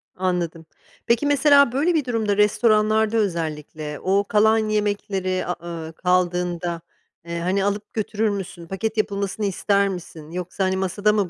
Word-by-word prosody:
Anladım. 175 -3 -2 0.4
Peki, 235 +4 +2
mesela, 285 -2 +5
böyle 295 +8 +1
bir 310 -5 +1
durumda 220 -4 0
restoranlarda 215 +1 +3
özellikle 155 -6 -3
o 195 +2 +2
kalan 220 +1 +4
yemekleri, 205 -3 -1
a 180 - -2
ııı, 165 -1 -6
kaldığında, 175 -1 0 0.5
ııı, 170 0 -3
hani, 190 +3 +1
alıp 205 +1 -3
götürür 215 0 -1
müsün, 190 -4 -5
paket 215 +5 -3
yapılmasını 200 0 -1
ister 200 +1 +1
misin 165 -4 -8
yoksa, 180 +2 -3
hani, 190 0 +1
masada 195 +3 +1
mı 205 -4 +1
200 Hz, 145 wpm, -23 LUFS, 180-215 Hz, 0.5 s, mesela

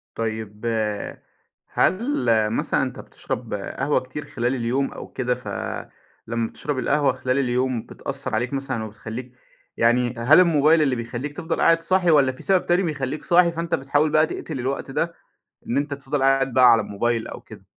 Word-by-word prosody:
طيب، 110 -1 -4 1.0
هل 235 +10 +1 0.3
مثلًا 110 - 0
أنت - - -5
بتشرب - - -6
قهوة 140 +1 -1
كتير 130 +4 -8
خلال 120 +1 -1
اليوم 130 +3 -1
أو - - -8
كده، 125 -1 -1
ف - - -12 0.8
لمَّا 115 0 -1
بتشرب 145 -3 -4
القهوة 140 0 +2
خلال 130 +1 -1
اليوم 125 -2 0
بتأثَّر 140 -4 -5
عليك 120 +4 -1
مثلًا 135 -4 -2
وبتخلّيك 110 +4 -7 0.5
يعني 120 +1 +3
هل 135 +9 +6
الموبايل 160 -2 +5
اللي 135 -4 +2
بيخلّيك 120 +5 -5
تفضل 165 +1 -2
قاعد 165 0 +4
صاحي 180 0 +2
والَّا 140 -4 +5
في 130 - -11
سبب 190 -2 +2
تاني 175 +2 +2
بيخلّيك 150 -2 -3
صاحي، 175 0 +4
فأنت 170 +1 -1
بتحاول 145 +3 +1
بقى 155 +1 +4
تَقتِل 155 -3 -6
الوقت 135 +2 -3
ده 165 +4 -1 0.5
إن 120 - -2
أنت 145 0 0
تفضل 140 0 -3
قاعد 135 -1 +3
بقى 125 -2 +7
على 115 -2 +4
الموبايل 115 +3 -1
أو - - -8
كده؟ - - -14
135 Hz, 170 wpm, -23 LUFS, 120-150 Hz, 1.0 s, بقى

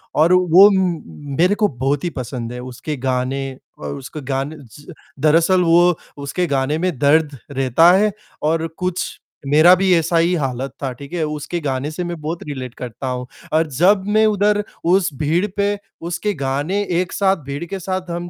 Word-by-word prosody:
और 160 +4 +4
वो 180 +2 +7
म 170 -6 -2
मेरे 185 +4 +4
को 210 0 +2
बहुत 135 - -2
ही 175 - 0
पसंद 125 -4 -5
है 125 - -6
उसके 130 +4 -6
गाने 130 +1 -1 0.4
व - - -8
उसके 145 +3 -8
गाने 135 +4 -2
च 145 +9 -13 0.3
दरअसल 165 +5 +4
वो 175 +1 +4 0.3
उसके 160 +6 -1
गाने 140 +1 0
में 180 +3 0
दर्द 145 0 +3
रहता 135 +5 +4
है 210 +1 +2 0.3
और 160 +1 +1
कुछ 180 0 -1 0.4
मेरा 155 +5 +7
भी 190 -1 +4
ऐसा 165 +1 +1
ही 170 +2 +3
हालत 135 -3 -3
था, 135 - -1
ठीक 140 +6 -12
है। 170 -2 -1
उसके 150 +3 -3
गाने 140 +1 -2
से 180 +3 -4
मैं 175 -2 -5
बहुत 160 +3 -4
रिलेट 130 -4 -6
करता 125 +2 -6
हूँ, 125 0 -3 0.3
और 160 +1 +3
जब 180 +8 +3
मैं 215 +1 +3
उधर, 210 0 +2 0.2
उस 180 +2 +3
भीड़ 160 +7 +1
पे 205 0 +1 0.2
उसके 175 +5 -2
गाने 145 +9 -1 0.2
एक 185 0 -5
साथ 195 -1 +2
भीड़ 140 +3 -5
के 190 +3 -5
साथ 185 0 -4
हम 175 +1 -4
160 Hz, 185 wpm, -19 LUFS, 140-180 Hz, 0.4 s, वो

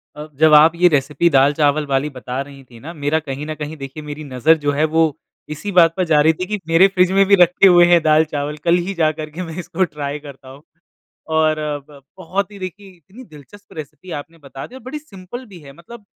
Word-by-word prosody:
अ, 150 +1 -8
जब 155 0 +5
आप 150 +2 +7
ये 180 +1 +4
रेसिपी 150 +2 +1
दाल-चावल 145 +1 +2
वाली 135 +2 0
बता 125 -1 -6
रही 140 -1 -11
थी 120 -3 -17
ना 160 +7 -9
मेरा 150 0 -1
कहीं 145 -1 -6
न 155 - -5
कहीं 150 +1 -7
देखिए 140 +2 -9
मेरी 150 +1 -8
नज़र 145 +4 +2
जो 145 - +1
है, 145 +2 0
वो 160 -1 +1 0.3
इसी 155 +7 -6
बात 170 -3 +5
पर 185 - +1
जा 155 -3 +3
रही 160 +2 +4
थी 185 - -2
कि 210 +1 -3
मेरे 165 +4 +5
फ्रिज 185 -1 +1
में 195 - +5
भी 200 +1 +5
रखे 180 +3 +5
हुए 175 -1 +6
हैं 170 -1 +5
दाल-चावल 150 -1 +1
कल 170 0 +3
ही 195 - -3
जा 160 -4 +1
कर 155 0 -5
के 160 +4 -8
मैं 165 -2 -8
इसको 185 +2 -2
ट्राई 145 0 -5
करता 140 -3 -13
हूँ 135 +2 -14 0.8
और 155 -1 +2 0.3
ब 145 -2 -16 0.2
बहुत 190 +3 -3
ही 200 - -12
देखिए 195 +2 -8
इतनी 190 - -15
दिलचस्प 195 - -16
रेसिपी 155 +2 -10
आपने 165 +3 -20
बता 135 0 -9
दी 250 - -15
और 260 - -11
बड़ी 260 +5 -7
सिंपल 240 - -11
भी 195 -6 -14
है, 140 -2 -13
मतलब 205 +8 -14
155 Hz, 235 wpm, -18 LUFS, 145-180 Hz, 0.8 s, आप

